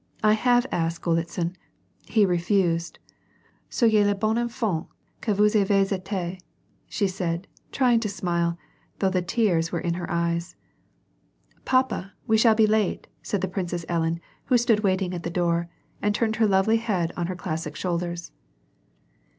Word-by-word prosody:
I 215 0 +6
have 245 +2 +3
asked 165 0 -1
Golitsin, 170 +1 -1 0.5
he 215 -3 +4
refused. 175 -2 +1 0.7
Sayez 220 -4 +3
le 205 - +2
bon 215 +2 0
enfant 235 -8 -1 0.3
que 220 - -1
vous 210 +1 +4
avez 195 -2 +3
eti/^ 185 -1 -3 0.5
she 205 - 0
said, 180 -1 -3 0.3
trying 250 -4 +3
to 220 -2 -2
smile, 170 -3 -1 0.4
though 190 -1 +1
the 185 -1 +1
tears 175 -4 +1
were 170 - -1
in 170 0 -1
her 175 0 -5
eyes. 170 0 -1 0.6
" - - -38
Papa, 255 -7 +1
we 220 -3 +3
shall 220 0 +5
be 220 0 +5
late," 215 -2 +1 0.2
said 205 - -2
the 190 - 0
Princess 175 -2 -3
Ellen, 165 -1 0 0.3
who 250 - +4
stood 230 -2 +3
waiting 190 -3 0
at 175 - -4
the 170 - -4
door, 170 -1 0 0.3
and 205 0 +1
turned 220 -1 0
her 225 -2 +4
lovely 195 +3 +3
head 195 -7 -1
on 170 -1 -2
her 185 - -3
classic 165 -2 -4
shoulders. 175 -1 -3
190 Hz, 160 wpm, -25 LUFS, 170-215 Hz, 0.7 s, I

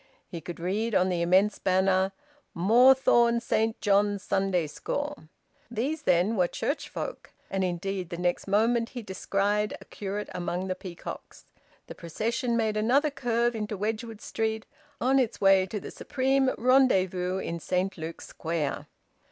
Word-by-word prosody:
He 170 - -7
could 170 +2 -8
read 205 +6 -1
on 185 +1 +3
the 175 -2 0
immense 190 +4 +3
banner: 190 0 +2 0.4
"Moorthorne 235 +4 +5
Saint 225 -1 0
John's 205 -1 +2
Sunday 190 -3 +1
School." 290 - -4 0.4
These, 265 +7 -2
then, 185 -2 +2
were 180 -3 +3
church 285 - -3
folk. - - -6 0.2
And 195 -1 0
indeed 185 0 -3
the 170 - -5
next 175 +2 -1
moment 230 +4 +2
he 245 -3 -7
descried 205 +2 -1
a - - -14
curate 205 +1 -5
among 180 +1 -3
the 185 - -1
peacocks. 180 -2 -9 0.4
The - - -9
procession 230 - -2
made 220 -2 0
another 270 +8 +2
curve 240 -3 0
into 210 -1 -3
Wedgwood 220 +2 -3
Street, 220 0 -2 0.3
on 265 +2 +3
its 245 -4 -1
way 195 -1 +5
to 210 +2 -4
the - - -8
supreme 265 0 +1
rendezvous 190 -8 +3
in 170 -3 -4
Saint 185 +3 -1
Luke's 165 0 -7
Square. 160 -3 -3
205 Hz, 150 wpm, -27 LUFS, 185-235 Hz, 0.4 s, Moorthorne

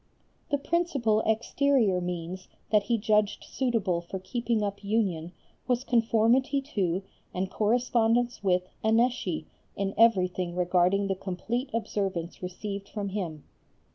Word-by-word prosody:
The 285 - +2
principal 280 -8 +1
exterior 220 -3 +2
means 180 +1 -5 0.2
that 210 -1 +5
he 235 - +2
judged 210 -1 +1
suitable 225 -9 0
for 175 +3 -6
keeping 230 +3 -1
up 200 0 -3
union 195 -6 0 0.4
was 250 0 +1
conformity 240 +3 +3
to 185 -2 0 0.3
and 185 +1 -2
correspondence 235 +1 +1
with 180 -2 +2 0.2
Annecy 220 -7 +1 0.3
in 195 0 -2
everything 185 -5 +3
regarding 180 +2 +2
the 195 - 0
complete 200 +8 -3
observance 195 -6 -2
received 195 +2 -5
from 205 -2 -3
him. 175 -7 -4
205 Hz, 120 wpm, -28 LUFS, 185-235 Hz, 0.4 s, that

